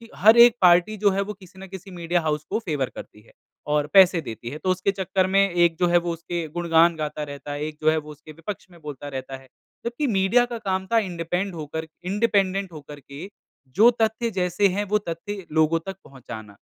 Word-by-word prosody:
हर 220 +3 +6
एक 235 0 +8
पार्टी 180 +4 +4
जो 205 0 +3
है 195 - 0
वो 205 +1 -4
किसी 190 -2 -17
न 195 - -9
किसी 190 +1 -10
मीडिया 175 0 -1
हाउस 150 -1 -1
को 215 - 0
फ़ेवर 150 - -2
करती 105 - -11
है 110 - -22 0.4
और 150 0 +1
पैसे 185 -3 +7
देती 115 -3 -7
है 145 - -7
तो 185 - -3
उसके 185 +2 0
चक्कर 190 -1 0
में 195 - +4
एक 175 -1 +3
जो 175 - +3
है 175 - +4
वो 175 - -2
उसके 170 0 -5
गुणगान 170 -1 +3
गाता 150 -1 -4
रहता 145 0 -8
है, 145 +1 -4
एक 155 0 -5
जो 155 - +4
है 160 - 0
वो 150 -1 -6
उसके 155 +1 -13
विपक्ष 165 +6 -7
में 170 - -17
बोलता 145 -1 -8
रहता 135 -1 -6
है 130 - -18 0.4
जबकि 240 +5 -2
मीडिया 210 +3 +3
का 240 -1 -6
काम 190 -2 -2
था 230 - +4
इंडिपेंड 180 0 -3
होकर 160 +1 -6 0.2
इंडिपेंडेंट 195 -2 0
होकर 150 -2 -11
के 140 +7 -10 0.5
जो 225 +4 +8
तथ्य 220 +1 +1
जैसे 180 +3 +2
हैं 205 - 0
वो 210 - +3
तथ्य 195 +3 -6
लोगों 160 +1 +2
तक 195 0 -6
पहुँचाना। 110 -6 -11
175 Hz, 220 wpm, -24 LUFS, 150-195 Hz, 0.5 s, एक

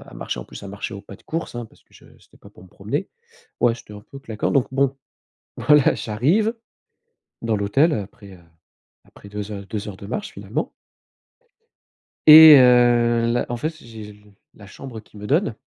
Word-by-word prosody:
à - - -14
marcher - - -5
en - - -10
plus - - -12
à 100 - -9
marcher 100 +1 -7
au 100 - -10
pas 100 -1 -13
de - - -26
course, 165 -4 -5
hein, 120 -1 -6
parce - - -25
que - - -36
je - - -19
c'étais - - -24
pas - - -16
pour - - -19
me 95 - -17
promener. 125 - -5 0.5
Ouais, 120 -1 +3
c'étais 115 -3 -14
un 105 - -10
peu 135 +6 -13
claquant. 110 -6 -4
Donc 135 -4 +1
bon, 135 0 0 0.6
voilà, 150 -2 +3
j'arrive 165 - 0 0.9
dans 115 -1 -1
l'hôtel 135 +11 +1
après, 100 -3 -7
heu, 95 - -15 0.7
après 100 - -17
2 105 +1 -7
heures 100 -1 -8
2 105 +1 -6
heures 95 -2 -9
de 100 - -10
marche, 205 - -5
finalement - - -5 1.6
et 155 0 +11
heu, 120 -2 +4
là, 120 - -1
en 120 - -3
fait, 155 +7 -4
j'ai 110 -3 -11 0.4
la 105 - -15
chambre 115 +3 -10
qu'il 105 -1 -17
me 105 - -8
donne, 150 - 0
115 Hz, 195 wpm, -21 LUFS, 105-140 Hz, 1.6 s, et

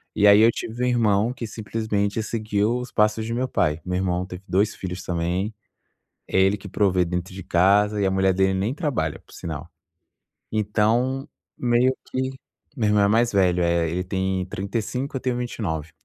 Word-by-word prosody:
E 105 - +3
aí 100 +1 +8
eu 115 +1 +6
tive 120 +3 -5
um - - +2
irmão 115 -2 +2
que 120 -2 -6
simplesmente 110 -1 -2
seguiu 110 +1 0
os 125 - -7
passos 105 +1 +2
de 115 - -3
meu 130 +1 0
pai. 75 -8 0
Meu 90 0 -1
irmão 90 -1 0
teve 90 +1 -9
2 100 +3 +2
filhos 90 0 -6
também. 90 +5 -1 0.8
É - - +1
ele 95 +2 +4
que 100 - -10
provê 95 -2 +2
dentro 90 +1 -3
de 95 - -7
casa, 100 +4 +3
e 100 - +2
a - - +2
mulher 95 0 +2
dele 95 0 +2
nem 100 +8 -1
trabalha, 130 - -2
por - - -22
sinal. 80 0 -6 0.8
Então, 115 +6 +1 0.3
meio 125 +2 +3 0.2
que 130 0 -1 0.5
meu 110 -4 +1
irmão 105 -1 +4
é - - +3
mais 115 +2 +3
velho, 90 -3 +3
é. 85 -1 +1
Ele 90 +2 -2
tem 95 0 -1
35, 115 +8 -3
eu - - -2
tenho 130 -1 -1
29. 90 -11 -3
100 Hz, 185 wpm, -24 LUFS, 95-115 Hz, 0.8 s, aí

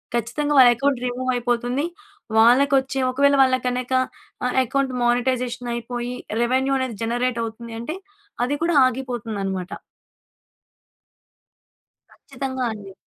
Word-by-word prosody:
ఖచ్చితంగా 245 +6 -1
వాళ్ళ 250 -2 +9
account 275 +1 0
remove 255 +1 -1
అయిపోతుంది. 245 +3 -1 0.5
వాళ్ళకొచ్చే 270 +3 +4
ఒకవేళ 280 +2 +3
వాళ్ళకనక 255 -1 0 0.5
ఆహ్, 250 - -1
అకౌంట్ 270 +1 -1
మానిటైజేషన్ 245 0 0
అయిపోయి 240 +1 -4 0.3
రెవెన్యూ 260 +3 +1
అనేది 255 -5 -3
జనరేట్ 240 +1 -1
అవుతుంది 230 +1 -8
అంటే 270 +8 -4 0.5
అది 265 +4 0
కూడా 340 -1 +1
ఆగిపోతుందనమాట. 225 -7 -3 2.4
ఖచ్చితంగా 260 -2 -5
అండి. 200 -3 -9
250 Hz, 100 wpm, -22 LUFS, 235-265 Hz, 2.4 s, వాళ్ళ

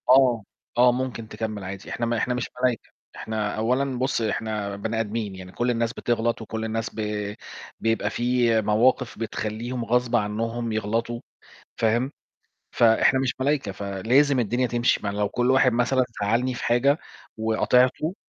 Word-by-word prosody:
آه. 125 -4 +5 0.3
آه 125 0 +6
ممكن 125 -3 -3
تكمّل 105 -1 -5
عادي، 95 +1 -7
إحنا 120 - -2
ما 115 0 0
إحنا 125 - 0
مش 125 -1 -3
ملايكة، 125 -3 0 0.3
إحنا 110 -2 -3
أولّا 125 +3 0
بُصّ 130 -1 0
إحنا 105 -2 -2
بني 110 +3 -2
آدميين، 105 -2 -3
يعني 90 -1 -10
كلّ 120 +5 -1
الناس 115 -1 -1
بتغلط 115 -1 -1
و - - -6
كلّ 110 +1 -4
الناس 115 +1 -2
ب 105 -1 -3 0.4
بيبقى 115 -2 0
في 120 -1 +2
مواقف 115 +4 +2
بتخلّيهم 115 +2 -3
غصب 120 +1 +1
عنهم 115 +2 -1
يغلطوا، 115 +2 -1 0.6
فاهم، 120 +4 +1 0.6
فإحنا 120 +3 +4
مش 130 -2 0
ملايكة 140 -6 0
فلازم 115 +9 +2
الدنيا 120 +3 +1
تمشي، 120 +1 +1
ما 105 - -2
لو 100 0 0
كلّ 125 +4 +1
واحد 130 -1 +4
مثلًا 125 +2 +2 0.2
زعلّني 120 +5 +1
في - - -5
حاجة 135 +5 +3 0.4
وقاطعته 125 +8 +2
115 Hz, 155 wpm, -25 LUFS, 110-125 Hz, 0.6 s, آه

